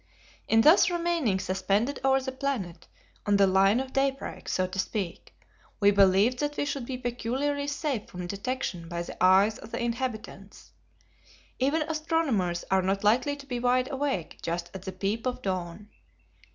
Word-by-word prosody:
In 225 0 +5
thus 325 - +6
remaining 340 - 0
suspended 195 +7 0
over 270 0 +4
the 265 0 -4
planet, 255 - -4 0.4
on 205 -1 +4
the 200 - +6
line 195 +4 +4
of 265 0 -5
daybreak, 270 0 -2
so 185 - +1
to 185 +1 -6
speak, 190 -3 -3 0.5
we 205 -1 +5
believed 200 +5 +4
that 295 0 -2
we - - 0
should 275 -4 -3
be 260 - -3
peculiarly 260 +4 -2
safe 285 -5 -2
from 180 0 -7
detection 200 -3 -4
by 170 0 -3
the 175 - -5
eyes 195 +4 +5
of - - -11
the - - -4
inhabitants. 235 -4 -5 0.9
Even 285 +5 +2
astronomers 310 - -1
are 190 0 +4
not 195 +2 -1
likely 250 +7 +3
to 280 -1 -12
be 250 -3 -3
wide 250 +1 +1
awake 270 - -2
just 170 +1 -3
at 190 - -7
the 190 - -4
peep 200 +6 -2
of 250 - -3
dawn. 185 +1 -4
230 Hz, 165 wpm, -28 LUFS, 190-270 Hz, 0.9 s, thus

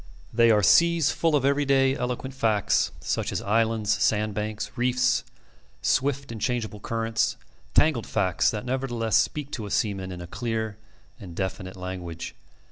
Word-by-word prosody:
They 115 0 +5
are 105 -2 +4
seas 170 - +5
full 165 -2 +1
of 135 -2 +2
every 140 +1 +3
day, 135 -1 +3
eloquent 125 +1 -3
facts, 110 -6 +1
such - - -2
as - - -1
islands, 110 0 +1
sand 105 0 +2
banks, 105 +1 -3
reefs, 125 +1 +2 0.6
swift 140 -1 +1
and 110 -2 -7
changeable 115 -4 -2
currents 115 +1 -1 0.4
tangled 145 -7 +3
facts 90 -3 +1
that 105 +1 -4
nevertheless 120 -4 -1
speak 140 +5 +1
to 110 -4 -4
a - - -7
seaman 95 -3 -1
in 90 -1 -7
clear 110 +1 -3 0.4
and 90 -6 -10
definite 95 0 -4
language. 90 -3 -6
115 Hz, 150 wpm, -26 LUFS, 105-130 Hz, 0.6 s, They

